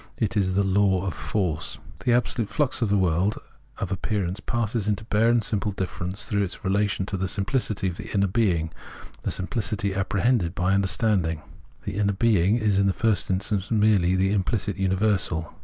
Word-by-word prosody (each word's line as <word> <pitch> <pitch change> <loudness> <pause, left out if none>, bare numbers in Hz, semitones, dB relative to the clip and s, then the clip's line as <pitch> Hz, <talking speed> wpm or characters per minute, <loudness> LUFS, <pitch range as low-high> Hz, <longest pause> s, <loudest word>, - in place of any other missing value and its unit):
It 105 -4 -1
is 95 -3 +1
the 100 - +3
Law 95 -1 +2
of 95 - -2
Force.* 90 -8 -2 0.3
The 125 - +3
absolute 120 -2 0
flux 145 -4 0
of 115 - +1
the 100 - +3
world 95 +2 +1 0.4
of 95 - -4
appearance 95 -1 -2
passes 115 -3 -2
into 105 +1 0
bare 110 +1 +2
and 120 -1 +3
simple 105 -2 0
difference 95 +1 -3
through 100 -1 0
its 100 0 -4
relation 100 0 +1
to 100 - -3
the 95 +1 -1
simplicity 100 0 -1
of 90 -1 -4
the - - -8
inner 100 -1 +2
being, 90 -6 +1 0.5
the - - -2
simplicity 100 0 -1
appre 95 0 -1
hended 110 -8 +2
by 90 0 +1
understanding. 95 -5 +1 0.4
The - - -4
inner 100 -1 +2
being 100 -1 +3
is 105 -4 +2
in 100 - +3
the 95 - +2
first 110 -1 0
instance 95 +1 -1
merely 105 -5 +3
the 95 +1 +2
implicit 100 +1 -1
universal. 95 -4 0
100 Hz, 185 wpm, -25 LUFS, 95-105 Hz, 0.5 s, the